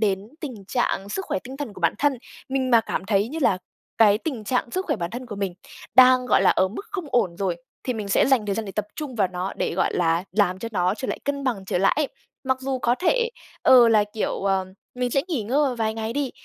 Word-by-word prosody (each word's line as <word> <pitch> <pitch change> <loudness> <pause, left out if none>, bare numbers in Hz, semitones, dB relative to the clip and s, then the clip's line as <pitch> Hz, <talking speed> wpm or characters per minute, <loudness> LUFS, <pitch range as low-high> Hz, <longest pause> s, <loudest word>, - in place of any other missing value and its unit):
đến 200 -3 +2 0.2
tình 245 - -7
trạng 200 -5 -1
sức 385 - -3
khỏe - - -1
tinh 260 +2 -8
thần 275 -7 -5
của 185 - -12
bản 165 - +2
thân. 290 -1 +3 0.4
Mình 265 -1 -1
mà 230 -2 +6
cảm - - -3
thấy 205 +1 +2
như 310 +5 -5
là 195 -7 +3 0.4
cái 210 -2 +6
tình 240 -5 -4
trạng 245 +1 -1
sức 370 +8 -2
khỏe - - 0
bản 170 0 -4
thân 250 +1 -6
của 210 - -7
mình 195 -3 -2 0.4
đang, 255 0 +7
gọi 195 - +4
là, 195 - +5
ở 185 - +2
mức 235 - -7
không 390 -4 -4
ổn 195 -9 +1
rồi 185 -2 -1 0.3
thì 255 - 0
mình 210 -2 -5
sẽ 195 - +3
dành 260 -6 +3
thời 200 - 0
gian 225 - -3
để 195 - -7
tập 210 -1 -2
trung 295 -5 -5
vào 200 -5 +2
nó 180 +1 -4
để, - - -1
gọi - - 0
là, 165 0 +1
làm 190 -2 +2
cho 230 - -5
nó 185 0 +1
trở 260 - -5
lại - - -2
cân 280 -1 -2
bằng 225 -7 -1
trở 185 - -1
lại 195 +2 +4
ấy. 300 -2 +1 0.4
Mặc 260 0 0
dù 265 0 -2
có 240 -1 +2
thể, 465 - +1 0.3
ờ, 245 -2 +7
là, 215 -2 +4
kiểu, 210 +1 -3
ờm, 190 -1 +1 0.3
mình 250 0 -1
sẽ 275 +2 +2
nghỉ 300 -11 -1
ngơi 250 +8 0
một 255 - -3
vài 220 -1 0
ngày 225 0 -3
đi, 280 -1 -1
225 Hz, 265 wpm, -24 LUFS, 195-260 Hz, 0.4 s, đang